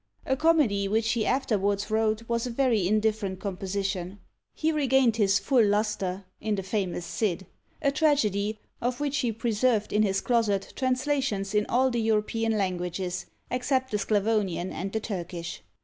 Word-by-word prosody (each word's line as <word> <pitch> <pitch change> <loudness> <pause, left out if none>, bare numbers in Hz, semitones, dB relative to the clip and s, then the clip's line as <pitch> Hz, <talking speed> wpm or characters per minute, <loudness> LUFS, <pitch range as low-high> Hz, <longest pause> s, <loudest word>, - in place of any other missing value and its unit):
A 265 - +1
comedy 275 -11 +3
which 220 +2 +1
he 225 -2 0
afterwards 205 -5 0
wrote 220 +1 +1
was 235 +1 -1
a - - -3
very 230 -6 +2
indifferent 210 -2 0
composition. 195 -1 -3 0.4
He 320 0 +1
regained 265 -6 +3
his 195 -3 +4
full 235 +5 +3
lustre 200 -2 0
in 215 -1 -1
the 195 - -3
famous 185 -3 -2
Cid, 190 -4 -1 0.4
a 280 - +3
tragedy, 220 -9 +1 0.2
of 245 +2 -1
which 290 0 0
he 245 -4 +1
preserved 225 0 0
in 210 - +3
his 195 -2 +2
closet 215 -5 0
translations 260 -6 0
in 210 0 +2
all 260 +2 +2
the 240 -1 0
European 220 0 +1
languages, 180 -1 -2 0.2
except 260 +1 0
the 210 - 0
Sclavonian 205 -4 0
and 195 +3 -4
the 220 - -1
Turkish. 175 - -5
215 Hz, 155 wpm, -27 LUFS, 195-245 Hz, 0.4 s, his